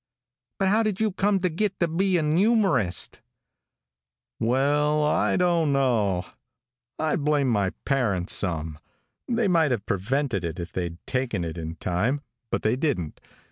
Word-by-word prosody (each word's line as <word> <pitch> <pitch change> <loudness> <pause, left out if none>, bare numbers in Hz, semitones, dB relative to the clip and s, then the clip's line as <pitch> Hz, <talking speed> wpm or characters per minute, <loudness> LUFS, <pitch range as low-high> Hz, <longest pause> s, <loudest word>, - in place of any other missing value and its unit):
"But 195 -1 +1
how 215 +3 +3
did 215 -4 -1
you 220 -1 +1
come 200 +1 +1
to 185 - +2
git 195 +4 -2
to 170 - +2
be 185 +3 +1
an 150 -2 +1
youmorist?" 185 - +2 1.2
"Well, 145 +5 +2
I 150 - +2
don't 170 -4 +2
know. 110 -10 +1 0.7
I 155 -1 0
blame 145 -2 +1
my 100 -5 +1 0.2
parents 105 -10 +1
some. 80 -5 -1 0.5
They 235 -3 +1
might 165 -5 +3
have 120 -6 -2
prevented 115 - -1
it 85 +1 -4
if 85 -2 -6
they'd 85 -1 -4
taken 125 -8 -1
it 80 -1 -5
in 80 -1 -5
time, 105 +12 -1 0.3
but - - -2
they 110 +2 +2
didn't. 130 - -2
135 Hz, 150 wpm, -25 LUFS, -, 1.2 s, how